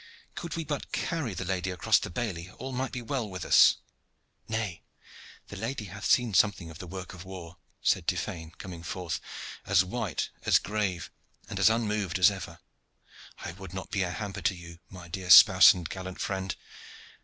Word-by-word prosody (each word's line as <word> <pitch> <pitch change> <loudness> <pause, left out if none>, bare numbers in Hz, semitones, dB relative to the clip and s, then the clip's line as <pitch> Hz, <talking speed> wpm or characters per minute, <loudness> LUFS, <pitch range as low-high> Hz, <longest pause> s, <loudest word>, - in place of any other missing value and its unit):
Could 170 -3 -5
we 165 - -2
but 145 -1 -4
carry 145 - -2
the 95 - -4
lady 95 0 -1
across 90 -3 +3
the - - -5
bailey, 90 -3 -4
all 130 +2 -6
might 130 +1 -2
be 125 - -5
well 115 -2 -2
with 95 -1 -6
us." - - +7 0.7
"Nay; 110 -7 -3 0.7
the - - -8
lady 115 +2 -4
hath 105 - -7
seen 120 -4 +3
something 95 -4 +2
of 80 - -12
the 90 - -7
work 95 +1 -7
of 90 0 -9
war," 90 -2 -9 0.3
said - - +2
Tiphaine 80 -2 -2
coming 90 -3 -8
forth, 85 -1 -4 0.4
as 95 -1 +4
white, 95 - -3
as - - +5
grave, 95 -4 -2 0.4
and - - -5
as - - +6
unmoved 105 -5 0
as 95 +2 +6
ever. 95 -2 -7 0.9
"I - - -4
would 95 +1 -10
not 95 - -6
be 95 - 0
a 90 - 0
hamper 100 +1 -5
to 85 +2 +1
you, 85 -1 -11
my 90 -2 -11
dear 90 +2 -6
spouse 95 0 +10
and 90 -3 -4
gallant 95 0 -7
friend. 95 -1 -2
95 Hz, 185 wpm, -29 LUFS, 90-110 Hz, 0.9 s, spouse